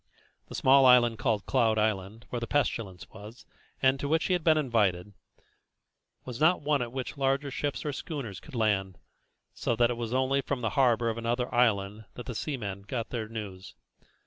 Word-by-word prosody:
The -, -, -8 dB
small 135 Hz, 0 st, +5 dB
island 120 Hz, -3 st, +5 dB
called 105 Hz, -2 st, 0 dB
Cloud 115 Hz, -4 st, +2 dB
Island, 105 Hz, 0 st, -1 dB
where 120 Hz, -, -2 dB
the 115 Hz, -, -4 dB
pestilence 110 Hz, -10 st, -1 dB
was, 110 Hz, +3 st, -12 dB, 0.4 s
and 135 Hz, +1 st, +4 dB
to 140 Hz, -, -3 dB
which 160 Hz, +2 st, +2 dB
he 185 Hz, -, +1 dB
had 175 Hz, -3 st, 0 dB
been 155 Hz, -1 st, +4 dB
invited, 105 Hz, -9 st, 0 dB, 1.1 s
was 125 Hz, -1 st, -7 dB
not 160 Hz, +1 st, +4 dB
one 145 Hz, -2 st, +1 dB
at 120 Hz, -1 st, -3 dB
which 130 Hz, +2 st, -5 dB
larger 135 Hz, +1 st, 0 dB
ships 145 Hz, +2 st, -3 dB
or 145 Hz, -, -2 dB
schooners 125 Hz, -, -6 dB
could -, -, -13 dB
land, 95 Hz, -4 st, 0 dB, 0.6 s
so 120 Hz, -, -1 dB
that 120 Hz, +1 st, +3 dB
it 120 Hz, -, -4 dB
was 115 Hz, -1 st, -4 dB
only 130 Hz, +2 st, +1 dB
from 135 Hz, -2 st, -3 dB
the 115 Hz, -, -1 dB
harbour 120 Hz, -4 st, +2 dB
of 115 Hz, -, -5 dB
another 120 Hz, +2 st, -2 dB
island 110 Hz, -3 st, +1 dB
that 125 Hz, -, -8 dB
the 125 Hz, -, -5 dB
seamen 110 Hz, -7 st, -4 dB
got 115 Hz, +3 st, -4 dB
their 115 Hz, -3 st, -4 dB
news. 100 Hz, -5 st, -8 dB
120 Hz, 190 wpm, -28 LUFS, 110-135 Hz, 1.1 s, small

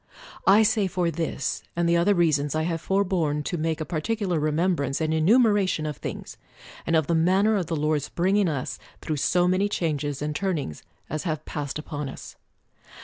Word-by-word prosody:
I 205 Hz, +3 st, +7 dB
say 210 Hz, -2 st, +2 dB
for 180 Hz, -2 st, 0 dB
this 160 Hz, -3 st, -2 dB
and 170 Hz, 0 st, +1 dB
the 170 Hz, -, +3 dB
other 185 Hz, +4 st, +3 dB
reasons 150 Hz, -4 st, +2 dB
I 155 Hz, -, +1 dB
have 165 Hz, -1 st, -2 dB
forborne 180 Hz, -7 st, 0 dB
to 175 Hz, -, -3 dB
make 160 Hz, 0 st, -1 dB
a 155 Hz, -, -3 dB
particular 180 Hz, +1 st, -1 dB
remembrance 150 Hz, -2 st, 0 dB
and 160 Hz, -1 st, 0 dB
enumera 205 Hz, +4 st, +4 dB
tion 155 Hz, -3 st, -2 dB
of 150 Hz, -2 st, -4 dB
things, -, -, -7 dB, 0.5 s
and 165 Hz, -, +2 dB
of 160 Hz, -2 st, +3 dB
the 170 Hz, -, 0 dB
manner 190 Hz, +6 st, +3 dB
of 185 Hz, -5 st, -1 dB
the 165 Hz, -, -2 dB
Lord's 150 Hz, -1 st, 0 dB
bringing 190 Hz, +2 st, +2 dB
us 140 Hz, -5 st, -3 dB, 0.2 s
through 155 Hz, -2 st, -2 dB
so 175 Hz, +5 st, +2 dB
many 190 Hz, +3 st, +2 dB
changes 150 Hz, -6 st, -2 dB
and 150 Hz, 0 st, -3 dB
turn 190 Hz, 0 st, 0 dB
ings 80 Hz, -, -5 dB, 0.3 s
as 155 Hz, 0 st, -3 dB
have 155 Hz, -3 st, -3 dB
passed 145 Hz, -2 st, -4 dB
upon 150 Hz, -2 st, -5 dB
us. -, -, -10 dB
165 Hz, 195 wpm, -25 LUFS, 150-185 Hz, 0.5 s, I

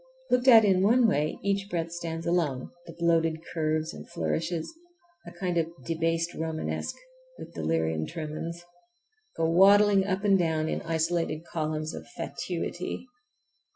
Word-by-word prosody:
Looked 250 Hz, +1 st, +2 dB
at 225 Hz, -4 st, +9 dB
in 190 Hz, -2 st, +3 dB
one 230 Hz, +4 st, +5 dB
way 155 Hz, -6 st, 0 dB
each 200 Hz, 0 st, 0 dB
breadth 165 Hz, -2 st, -2 dB
stands 165 Hz, -1 st, -5 dB
alone, 160 Hz, -7 st, 0 dB, 0.2 s
the -, -, -8 dB
bloated 165 Hz, -1 st, +1 dB
curves 155 Hz, -1 st, -1 dB
and 75 Hz, -, -10 dB
flourishes—a 175 Hz, -, -5 dB
kind 175 Hz, -1 st, -1 dB
of 165 Hz, 0 st, -1 dB, 0.2 s
"debased 165 Hz, +1 st, 0 dB
Romanesque" 160 Hz, 0 st, -3 dB, 0.4 s
with -, -, -10 dB
delirium 80 Hz, 0 st, -1 dB
tremens—go 175 Hz, -, -7 dB
waddling 195 Hz, +3 st, +5 dB
up 190 Hz, +1 st, -1 dB
and 195 Hz, -2 st, +4 dB
down 160 Hz, -2 st, +1 dB
in -, -, -2 dB
isolated 165 Hz, 0 st, -1 dB
columns 155 Hz, -1 st, -3 dB
of -, -, -8 dB
fatuity. 180 Hz, +5 st, -4 dB
170 Hz, 130 wpm, -28 LUFS, 160-195 Hz, 0.4 s, at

